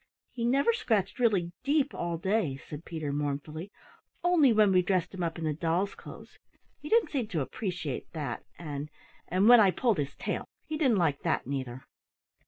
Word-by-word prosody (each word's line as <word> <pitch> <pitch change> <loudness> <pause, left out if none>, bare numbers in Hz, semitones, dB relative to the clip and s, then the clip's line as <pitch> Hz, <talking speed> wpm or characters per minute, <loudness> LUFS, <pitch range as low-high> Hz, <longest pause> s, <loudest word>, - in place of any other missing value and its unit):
"He 235 -2 -3
never 275 - +3
scratched 205 - 0
really 200 -8 +2
deep 285 +1 +2
all 170 -1 -2
day," 180 -6 0
said 150 +2 -8
Peter 155 -4 -4
mournfully, 150 +5 -3 0.5
"only 345 -7 +5
when 215 -2 +5
we 185 -1 +5
dressed 185 0 0
him 190 - -5
up 165 -1 -2
in 165 - -5
the 155 - +1
doll's 170 +5 0
clothes - - -12 0.4
he 300 0 -8
didn't 450 -6 +3
seem 255 -7 -1
to 160 -9 -1
'preciate 170 - -4
that 145 -7 -4
an' 150 -3 -5 0.4
an' 185 +4 +2
when 245 0 +9
I 205 -3 +6
pulled 220 -1 +1
his 140 -1 -3
tail - - -3 0.2
he 310 - -4
didn't 265 -8 +3
like 160 -6 +1
that, - - 0
neither." 130 -1 -4
180 Hz, 185 wpm, -29 LUFS, 150-235 Hz, 0.5 s, when